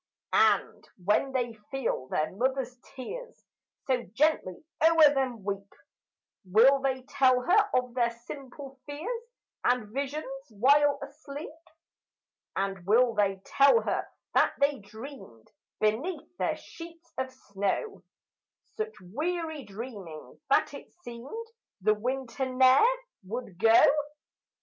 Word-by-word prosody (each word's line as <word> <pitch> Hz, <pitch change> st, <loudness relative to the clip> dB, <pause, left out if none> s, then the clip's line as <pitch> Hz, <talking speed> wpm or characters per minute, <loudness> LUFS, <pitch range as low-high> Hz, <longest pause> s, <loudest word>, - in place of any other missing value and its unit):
And -, -, +2 dB
when 210 Hz, +8 st, +2 dB
they 245 Hz, -3 st, -1 dB, 0.2 s
feel 260 Hz, -, -2 dB
their 155 Hz, +3 st, -1 dB
mother's 255 Hz, +4 st, -1 dB, 0.2 s
tears 485 Hz, -, -8 dB, 0.4 s
So 255 Hz, -2 st, +1 dB
gently 295 Hz, -, +1 dB, 0.2 s
o'er 320 Hz, -2 st, +7 dB
them 255 Hz, -6 st, -1 dB
weep, 200 Hz, 0 st, -4 dB, 0.7 s
Will 235 Hz, +9 st, +5 dB
they 265 Hz, -1 st, -1 dB
tell 255 Hz, -1 st, +3 dB
her 410 Hz, +8 st, +4 dB
of 250 Hz, -1 st, 0 dB
their 240 Hz, -1 st, +2 dB
simple 265 Hz, +3 st, -10 dB
fears 375 Hz, +12 st, -4 dB, 0.4 s
And 245 Hz, -4 st, +1 dB
visions 280 Hz, +3 st, -3 dB, 0.2 s
while 280 Hz, +6 st, +4 dB
asleep? 285 Hz, +1 st, -8 dB, 1.0 s
And 195 Hz, -1 st, -2 dB
will 230 Hz, +5 st, +4 dB
they 195 Hz, -2 st, 0 dB
tell 280 Hz, +12 st, +5 dB
her -, -, -1 dB, 0.3 s
that -, -, +3 dB
they 280 Hz, -1 st, +2 dB
dreamed, 215 Hz, -, -11 dB, 0.3 s
Beneath 280 Hz, +12 st, -1 dB
their -, -, 0 dB
sheets 335 Hz, 0 st, -12 dB
of 260 Hz, 0 st, -2 dB
snow, 205 Hz, -, -3 dB, 0.8 s
Such 440 Hz, 0 st, -3 dB
weary 315 Hz, -, -3 dB
dreamings 200 Hz, -7 st, -9 dB
that 275 Hz, -, +3 dB
it 280 Hz, -, -10 dB
seemed 245 Hz, -, -7 dB, 0.4 s
The 215 Hz, +3 st, +4 dB
winter 260 Hz, +4 st, -3 dB
ne'er 260 Hz, -, +6 dB, 0.4 s
would 200 Hz, -3 st, -6 dB
go? 225 Hz, +2 st, +7 dB
260 Hz, 115 wpm, -29 LUFS, 215-290 Hz, 1.0 s, o'er